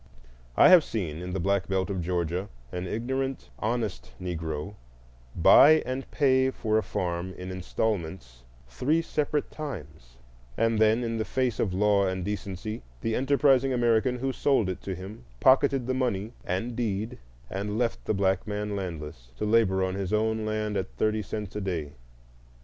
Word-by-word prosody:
I - - +8
have 180 -4 +8
seen, 85 - -4
in 90 0 -5
the 95 - -1
Black 100 +1 +1
Belt 95 0 0
of 95 -2 -2
Georgia, 90 +2 -2 0.2
an 90 0 -4
ignorant, 130 - -3
honest 105 - -2
Negro 80 -1 -4 0.6
buy 145 - +7
and 130 +1 -4
pay 130 -2 +3
for 110 -4 0
a - - 0
farm 90 -1 -3
in 90 +1 -6
installments 90 - -3 0.3
three 145 - 0
separate 150 -2 -1
times, 80 - -8 0.4
and 115 -1 +2
then 110 +2 +4
in 115 -1 -2
the - - +1
face 125 -1 -1
of 100 - +1
law 100 0 +3
and 95 -1 -2
decency 105 +2 -4 0.2
the 115 - -1
enterprising 135 0 +3
American 120 +1 +2
who 135 +1 -2
sold 130 -10 +2
it 95 - -4
to 95 - -4
him 95 - -9 0.2
pocketed 135 - +4
the 130 - 0
money 120 -4 -1
and 115 +7 -2
deed 110 -2 -2 0.3
and 100 - -3
left 120 -1 -1
the - - +1
black 95 0 +1
man 105 0 -3
landless, 75 -9 -6
to 105 - -2
labor 105 -4 +3
on 95 0 -1
his 95 -1 -3
own 110 0 +1
land 105 -1 -1
at 95 -11 -4
thirty 110 0 +1
cents 105 0 -6
a 105 - -2
day. 85 -7 -3
105 Hz, 165 wpm, -27 LUFS, 90-120 Hz, 0.6 s, I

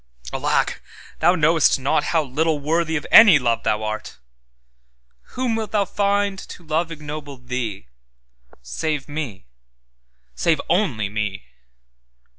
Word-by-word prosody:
Alack, - - 0 0.4
thou 175 +3 +4
knowest 160 -1 +3
notHow 155 +4 +1
little 150 +3 0
worthy 160 +3 0
of 150 - -2
any 210 -8 +9
love 120 -3 0
thou 105 0 0
art! 110 0 -5 1.2
Whom 250 -3 0
wilt 220 -2 -4
thou 205 -2 +2
find 200 0 0
to 175 - -11
love 160 +2 -1
ignoble 150 -2 -7
thee, 125 -6 -5 0.8
Save 145 - -3
Me, 145 - -6 0.9
save 160 - +1
only 140 - +1
Me? 105 -1 -4
155 Hz, 115 wpm, -22 LUFS, 125-170 Hz, 1.2 s, any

